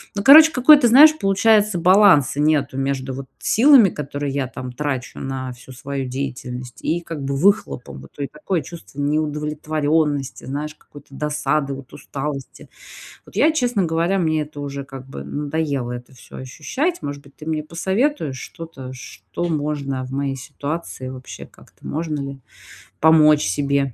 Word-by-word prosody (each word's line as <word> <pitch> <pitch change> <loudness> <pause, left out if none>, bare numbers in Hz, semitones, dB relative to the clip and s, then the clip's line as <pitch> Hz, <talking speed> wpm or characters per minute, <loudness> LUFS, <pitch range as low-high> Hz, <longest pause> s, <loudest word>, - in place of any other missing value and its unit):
Ну, 200 - -2
короче, 315 +3 +9
какой-то, 275 -1 +6
знаешь, 300 +6 +8
получается, 205 0 +3
баланса 180 -7 +5
нету 150 -3 +1
между, 135 -1 -2
вот, 135 +1 -6
силами, 245 -4 +6
которые 145 -2 -4
я, 135 -2 -1
там, 130 0 -7
трачу 130 -1 -4
на 130 -1 -4
всю 130 +1 -14
свою 135 +1 -5
деятельность, 125 -2 -6
и, 170 +2 0
как 165 -4 -7
бы, 135 0 -2
выхлопом, 135 - 0
вот. 70 - -16
И 140 - -1
такое 155 +4 -3
чувство 165 -4 -11
неудовлетворённости, 150 -1 -1
знаешь, 150 +3 -4
какой-то 145 - -16
досады, 150 0 -1
вот, 135 -1 -12
усталости. 140 -1 -6 0.6
Вот - - -18
я, 320 - +5
честно 245 - +1
говоря, 170 +4 0
мне 155 -3 +1
это 145 -1 -9
уже, 140 -1 -5
как 135 -1 -10
бы, - - -7
надоело 145 -4 -2
это 125 +2 -9
всё 105 -5 -14
ощущать. 265 - -3
Может 145 0 -5
быть, 140 - -20
ты 155 - -12
мне 155 -1 -1
посоветуешь 175 - -1
что-то, 140 -5 -9
что 120 - -7
можно 145 -4 -2
в 130 - -9
моей 135 0 -2
ситуации 140 0 -6
вообще, 130 -1 -9
как-то - - -19
можно 155 -1 -3
ли 140 -1 -6 0.6
помочь 155 -1 +5
себе? 140 +4 0
145 Hz, 155 wpm, -21 LUFS, 135-165 Hz, 0.6 s, короче